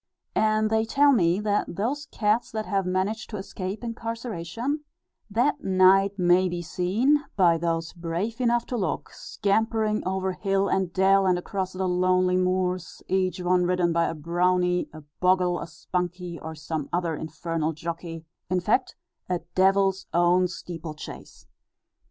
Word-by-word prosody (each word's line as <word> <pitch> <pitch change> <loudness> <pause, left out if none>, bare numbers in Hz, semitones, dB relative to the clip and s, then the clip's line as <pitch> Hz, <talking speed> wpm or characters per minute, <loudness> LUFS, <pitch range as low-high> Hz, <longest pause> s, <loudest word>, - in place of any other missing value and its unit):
And 215 0 +2
they 220 0 +3
tell 285 +5 +4
me, 180 -7 +3
that 205 -4 -1
those 275 - -2
cats 215 +2 0
that 215 -1 -2
have 195 -2 -1
managed 190 +4 -1
to 210 - -5
escape 190 +2 -5
incarceration, 230 - -4 0.5
that 250 +8 +1
night 195 +1 +4
may 180 0 +4
be 175 0 -4
seen, 215 - +1
by 170 -4 +4
those 165 0 -1
brave 175 +8 -3
enough 240 -1 +2
to 245 - -3
look, 195 - -2
scampering 215 +1 0
over 190 0 -1
hill 195 +1 0
and 190 -3 0
dell, 195 +1 +4
and 180 -1 +3
across 185 +1 -3
the 185 0 -1
lonely 185 0 +2
moors, 185 -1 -1
each 185 0 0
one 180 0 +3
ridden 175 -1 +1
by 170 0 +2
a 165 - -2
brownie, 180 +3 +1
a 155 - -10 0.2
bogle, 180 -1 +2
a - - -6
spunkie, 180 -1 -4
or 160 0 -6
some 155 -1 -4
other 170 -2 0
infernal 160 +1 -3
jockey, 165 +1 -6 0.2
in 185 0 +2
fact, 220 +8 +1 0.3
a 180 -1 -1
devil's 195 0 +3
own 175 +1 +4
steeplechase. 165 -3 -8
185 Hz, 150 wpm, -26 LUFS, 175-210 Hz, 0.5 s, tell